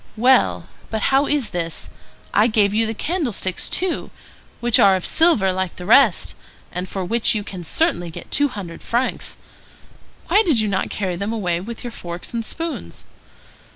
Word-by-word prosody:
Well, 255 +4 +3 0.2
but 220 - -2
how 275 +1 +4
is 285 -6 0
this? 165 -2 -2 0.5
I 210 +2 +4
gave 210 -3 +2
you 225 +1 +1
the 225 - -4
candlesticks 250 - -2
too, 370 -2 0 0.5
which 240 -1 +4
are 195 -1 +6
of 185 - -3
silver 245 - +3
like 185 -1 -3
the 180 - -8
rest, 225 -1 +4 0.4
and 180 +1 -5
for 190 -2 -4
which 230 +3 +2
you 210 - -2
can 185 -3 -8
certainly 175 - 0
get 160 - -10
two 290 - +3
hundred 195 -10 -8
francs. 245 +2 -2 0.9
Why 420 - +5
did 315 - +3
you 215 - +2
not 190 -1 -1
carry 185 -4 -3
them 200 +4 -3
away 180 -7 -1
with 230 +4 -8
your 240 - -5
forks 175 -3 -7
and 230 -1 -2
spoons?" 330 +7 -5
215 Hz, 175 wpm, -21 LUFS, 185-255 Hz, 0.9 s, are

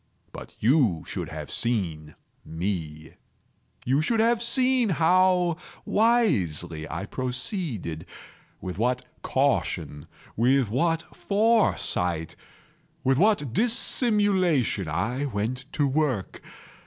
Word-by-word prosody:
But - - -10
you 115 - +2
should - - -5
have - - -7
seen 85 -10 -2 0.3
me. 80 -3 -5 0.7
You 135 +4 +2
should 225 +8 0
have 230 +1 +3
seen 255 -1 +2
how 180 0 +3 0.3
wisely 90 - +1
I - - -4
proceeded—with 125 - -6
what 125 +2 0 0.2
caution—with 110 - -1
what 165 +6 -1
foresight—with 135 - -1
what 185 - +2
dissimulation 200 - +2
I 110 - -1
went 125 +3 -4
to 145 - +1
work! 135 -7 -1
130 Hz, 85 wpm, -26 LUFS, -, 0.7 s, have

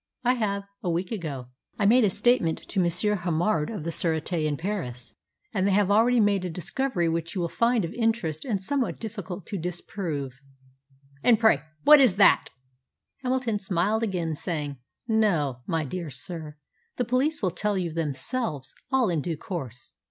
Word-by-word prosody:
"I 250 +1 +4
have 200 -5 -1 0.2
a 180 - -2
week 175 +2 -1
ago. 145 - -5 0.3
I 205 - +1
made 240 +4 +6
a 210 - +4
statement 205 -4 +2
to 200 - -1
M. 175 - +2 0.3
Hamard 170 -1 0
of 210 -8 -5
the 165 - -2
Sûreté 160 0 -1
in 145 -1 -1
Paris, 130 - -4 0.4
and 195 -2 +1
they - - +2
have 200 0 +3
already 235 +4 +4
made 205 -3 +3
a 180 - -2
discovery 180 +3 -1
which 165 +2 -2
you 185 - -1
will 170 - 0
find 230 -2 +2
of 165 - -6
interest 225 -10 -1
and 220 -7 -1
somewhat 255 +6 -1
difficult 200 -5 -6
to 200 - -4
disprove." 160 -6 -4 0.8
"And 230 -3 +5
pray 220 -9 +4 0.2
what 300 -1 +8
is 240 -9 +5
that?" 200 0 +5 0.8
Hamilton 250 -4 0
smiled 195 +3 0
again, 180 -7 -1
saying, 150 -3 -3 0.3
"No, 175 - +1
my 160 -2 0
dear 170 +3 -5
sir, 150 +3 -4 0.4
the 245 - -1
police 260 +4 0
will 185 - +2
tell 210 +2 -1
you 175 -4 -2
themselves 150 - -2 0.2
all 260 -3 +3
in 170 -5 0
due 165 +1 -3
course. 130 - -7
185 Hz, 175 wpm, -26 LUFS, 160-220 Hz, 0.8 s, what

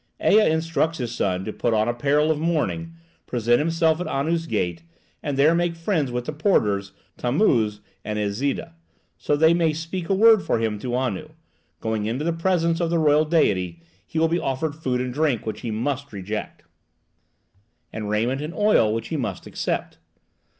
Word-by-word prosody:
Ea 215 +1 +5
instructs 160 0 0
his 120 -3 -3
son 95 -4 -1
to 110 - -4
put 115 -2 0
on 110 +1 +2
apparel 145 +6 +2
of 155 - -1
mourning, 165 +1 -1 0.3
present 120 0 +2
himself 165 +1 +1
at 180 - -3
Anu's 165 +4 -1
gate, 85 - -1 0.4
and 145 -2 -3
there 150 +4 +5
make 170 0 0
friends 165 -6 -1
with 125 0 -3
the 155 - -4
porters, 105 - +1 0.3
Tammuz 120 - +1 0.2
and 105 0 -3
Iszida, 135 +10 -2 0.5
so 145 - +1
that 155 +2 +3
they 160 - +6
may 165 -2 +2
speak 165 +3 -5
a 195 - +3
word 220 +1 +6
for - - 0
him 110 -2 -1
to 120 +3 -3
Anu; 130 +4 -2 0.5
going 110 -2 -1
into 125 +7 -2
the 170 - +1
presence 165 -1 +1
of 170 -2 0
the 170 - +1
royal 155 -1 +4
deity, 95 - +1 0.2
he 130 - -7
will 165 +1 +4
be 170 +2 0
offered 135 +2 -2
food 130 -5 -2
and 125 -1 -3
drink 145 -5 0
which 110 - -4
he 120 - -4
must 135 +6 -2
reject, 105 +1 -5 1.3
and 105 -2 -4
raiment 120 +6 0
and 155 +4 -5
oil 205 - +3
which 115 0 -4
he 160 - -2
must 120 -6 -4
accept. - - -3
145 Hz, 185 wpm, -23 LUFS, 115-165 Hz, 1.3 s, they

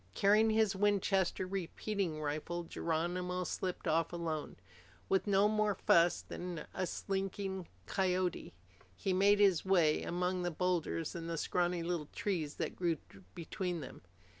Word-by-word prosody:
Carrying 210 +3 +5
his 220 -2 +3
Winchester 195 -2 +2
repeating 190 -2 -3
rifle, 155 +3 -3
Geronimo 175 +3 -2
slipped 180 +1 -3
off 165 +1 +2
alone. 165 -3 -3 0.5
With 195 +2 +2
no 200 0 +4
more 215 -1 +1
fuss 170 -1 +4
than 175 -2 -6
a 185 - -1
slinking 195 -1 -3 0.2
coyote, 185 - -1 0.4
he 190 - -1
made 200 +2 +5
his 195 -5 +4
way 175 -5 +3
among 180 +1 -1
the 175 - 0
boulders 170 -2 -1
and 170 -2 -5
the 165 - -2
scrawny 175 +2 0
little 170 -3 -2
trees 165 -8 -2
that - - -3
grew 170 -3 0 0.4
between 175 0 -3
them. 130 - -9
180 Hz, 140 wpm, -34 LUFS, 170-195 Hz, 0.5 s, Carrying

